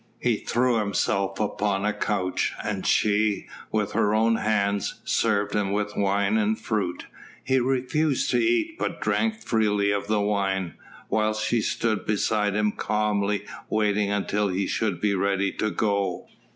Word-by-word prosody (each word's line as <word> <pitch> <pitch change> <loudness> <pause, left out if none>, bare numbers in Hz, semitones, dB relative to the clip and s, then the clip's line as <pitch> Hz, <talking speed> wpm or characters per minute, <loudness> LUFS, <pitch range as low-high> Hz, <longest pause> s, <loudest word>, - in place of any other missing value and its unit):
He 120 -3 +1
threw 120 0 +1
himself 100 -1 0
upon 105 -1 0
a 105 - +1
couch 95 -4 -1
and - - -2
she, 105 0 +2 0.3
with 105 -2 0
her 105 +1 +2
own 115 +1 +3
hands, 100 -2 0
served 105 -2 +1
him 100 -2 0
with 105 0 -2
wine 100 +1 +1
and 110 0 +1
fruit. 100 -6 -2 0.4
He 130 0 +2
refused 135 +3 0
to - - +3
eat 340 -2 +1
but - - -2
drank 220 0 0
freely 105 -3 +2
of 100 0 -2
the 110 0 +1
wine, 95 -3 0 0.3
whilst 110 0 0
she 115 0 +1
stood 110 0 -1
beside 105 -1 +1
him 105 0 +2
calmly 105 -1 0 0.2
waiting 105 -1 +1
until 105 0 0
he 95 +1 -1
should 105 -5 -1
be 105 -1 +1
ready 100 0 +1
to 110 - -1
go. 100 -4 -1
105 Hz, 150 wpm, -25 LUFS, 100-110 Hz, 0.4 s, own